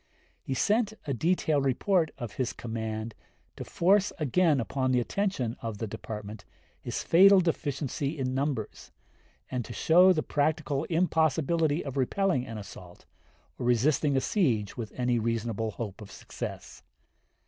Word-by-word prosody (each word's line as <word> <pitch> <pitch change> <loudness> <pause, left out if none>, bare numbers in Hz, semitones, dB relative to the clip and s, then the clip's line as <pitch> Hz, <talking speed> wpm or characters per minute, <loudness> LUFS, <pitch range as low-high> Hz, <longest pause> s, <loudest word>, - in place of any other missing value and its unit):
He 135 - -4
sent 215 - +1
a 140 - -1
detailed 155 0 +1
report 160 +6 +1
of 120 -5 -6
his 130 -2 -1
command 110 -1 -5 0.4
to - - -6
force 195 +3 +2
again 155 0 +2
upon 130 +3 -1
the 125 - +3
attention 130 - -1
of 115 -2 -4
the 110 - -3
Department 105 -1 -7 0.4
his - - -4
fatal 195 +3 +7
deficiency 145 -3 -2
in 130 -2 -2
numbers, 135 -5 -3 0.6
and 125 -2 -2
to 120 - -8
show 180 +7 +5
the 155 -4 +1
practical 150 -1 0
impossibility 160 -2 +1
of 140 -1 -5
repelling 135 0 +1
an 115 - -6
assault, 90 -3 -11 0.5
or 120 - -2
resisting 135 +4 +2
a - - +2
siege 120 - 0
with 115 -3 -6
any 125 -1 +1
reasonable 115 -1 -2
hope 105 -2 -6
of 105 - -10
success. - - -8
135 Hz, 145 wpm, -28 LUFS, 115-160 Hz, 0.6 s, fatal